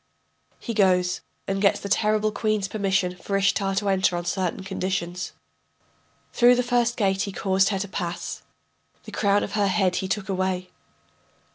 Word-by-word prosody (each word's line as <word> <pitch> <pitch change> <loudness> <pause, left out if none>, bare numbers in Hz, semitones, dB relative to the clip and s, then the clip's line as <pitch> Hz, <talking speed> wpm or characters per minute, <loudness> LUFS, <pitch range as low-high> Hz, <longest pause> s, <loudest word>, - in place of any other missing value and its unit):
[He 235 - -4
goes 180 -4 +2 0.3
and 195 0 -1
gets 200 - +3
the - - -6
terrible 215 +1 +2
queen's 215 -2 0
permission 195 -3 0
for 195 +2 -2
Ishtar 195 0 +1
to 200 0 0
enter 190 -2 +2
on 175 - -4
certain 185 +1 -2
conditions.] 185 -2 -3 1.0
Through 245 0 +6
the 250 - +1
first 240 -1 +1
gate 195 -3 +1
he 205 -2 -2
caused 190 0 +2
her 200 - 0
to 200 +1 -3
pass 175 -3 -4 0.6
The - - -10
crown 200 0 +2
of - - -4
her 205 -1 +1
head 190 -2 +1
he 190 - -2
took 190 0 -2
away. 185 -1 -2
195 Hz, 165 wpm, -24 LUFS, 185-205 Hz, 1.0 s, Through